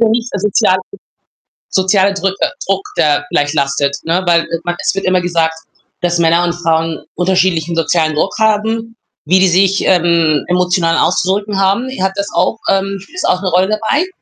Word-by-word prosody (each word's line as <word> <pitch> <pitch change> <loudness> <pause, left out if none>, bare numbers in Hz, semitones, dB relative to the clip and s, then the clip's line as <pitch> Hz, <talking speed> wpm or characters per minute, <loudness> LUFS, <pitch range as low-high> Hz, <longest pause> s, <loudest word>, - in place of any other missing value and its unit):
ja 230 - +4
nicht, 230 +2 0
äh, 200 - -2
sozialer 190 -2 +1 0.9
soziale 190 +1 +2
Drücke 195 +10 -1
Druck, 195 0 0
der 145 -1 +1
gleich 145 0 0
lastet, 140 -1 0
ne? 170 +3 0
Weil, 170 -1 +4
äh, 165 0 -4
man 175 0 -2
es - - 0
wird 195 - -3
immer 185 -1 +2
gesagt, 165 -2 0 0.5
dass 175 -1 0
Männer 170 +1 +3
und 175 - -1
Frauen 165 -2 -1
unterschiedlichen 180 -2 +1
sozialen 160 -1 +1
Druck 170 +6 -1
haben, 220 +1 0 0.3
wie 185 +4 +4
die 190 - +4
sich, 190 +2 +2
ähm, 170 -4 +2
emotional 180 -2 +1
auszudrücken 200 +2 0
haben. 200 +7 +1
Hat 190 0 +1
das 200 0 -2
auch - - +1
ähm, 195 0 0
spielt 195 - -14
das - - -7
auch 180 +2 +1
'ne 185 - -1
Rolle 185 +2 +2
dabei? 225 - 0
185 Hz, 180 wpm, -14 LUFS, 165-195 Hz, 0.9 s, ja